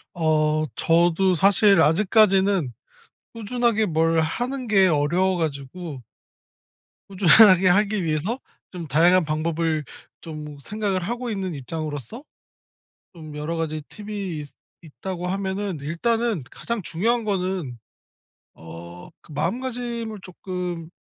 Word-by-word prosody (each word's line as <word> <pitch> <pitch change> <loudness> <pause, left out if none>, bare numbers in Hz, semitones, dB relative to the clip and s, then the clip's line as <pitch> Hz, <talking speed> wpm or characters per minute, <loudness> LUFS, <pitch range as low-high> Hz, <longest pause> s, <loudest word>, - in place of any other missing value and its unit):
어. 155 -1 +1
저도 175 +3 +3
사실 195 0 +5
아직까지는 190 - +3 0.6
꾸준하게 230 0 0
뭘 165 -1 +2
하는 245 +11 -2
게 195 -3 +4
어려워 175 +5 +1
가지고 150 -1 -5 1.1
꾸준하게 190 0 +6
하기 205 +1 +2
위해서 165 - -1 0.3
좀 175 -3 -7
다양한 170 +5 +4
방법을 155 0 -1 0.4
좀 150 -2 -8
생각을 200 +3 -2
하고 240 +4 -3
있는 190 -5 -3
입장으로서 150 - -6 0.9
좀 155 -3 -10
여러 150 +3 -3
가지 155 -1 -3
팁이 205 -5 -6
있 145 -1 -7 0.4
있다고 180 +3 -6
하면은 195 -1 -3
일단은 210 +6 -1
가장 235 -3 -4
중요한 230 +9 0
거는 185 - -2 0.8
어 85 +1 -11 0.3
그 165 - -15
마음가짐을 235 - -3
쪼끔 180 -2 -6
180 Hz, 245 characters per minute, -23 LUFS, 155-205 Hz, 1.1 s, 꾸준하게